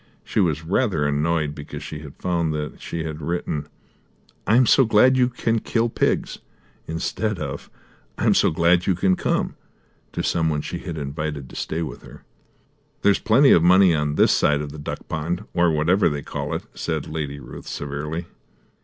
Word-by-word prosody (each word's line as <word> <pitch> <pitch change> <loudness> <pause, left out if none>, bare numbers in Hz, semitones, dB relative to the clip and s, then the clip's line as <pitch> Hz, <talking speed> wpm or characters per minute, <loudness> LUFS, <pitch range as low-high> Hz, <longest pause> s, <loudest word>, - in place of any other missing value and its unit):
She - - -2
was 80 -5 +1
rather 90 - +1
annoyed 75 +1 0
because 75 -1 -8
she 75 - -6
had 75 -3 -11
found 85 -3 -1
that 75 0 -5
she 85 -1 -4
had 80 -1 -5
written 75 -2 -3 0.8
"I 110 - +4
am 125 +1 +6
so 135 - +5
glad 120 +3 +5
you 125 -1 +3
can 115 -2 0
kill 115 +2 0
pigs," - - 0 0.5
instead 105 +6 -2
of 70 -4 -6 0.5
"I - - -1
am - - +5
so - - +4
glad 85 +2 +2
you 95 - +3
can 95 +1 +2
come" - - -1 0.6
to - - -2
some 80 -1 +1
one 75 -1 -1
she - - -5
had 80 - -6
invited 75 -1 -4
to - - -12
stay 80 +1 -2
with 75 - -7
her. - - -14 0.8
"There's 100 -1 +4
plenty 130 +6 +5
of 85 - +6
money 90 +1 +6
on 75 -1 0
this - - +4
side 75 0 +2
of 75 -1 -5
the 75 - -9
duck 75 - -6
pond, 85 +5 -3
or 85 0 +3
whatever 85 +5 +3
they 75 -2 -4
call - - -4
it," - - -4
said - - -3
Lady 75 -2 -4
Ruth 65 - -10
severely. 75 +4 -4
80 Hz, 190 wpm, -23 LUFS, 75-95 Hz, 0.8 s, am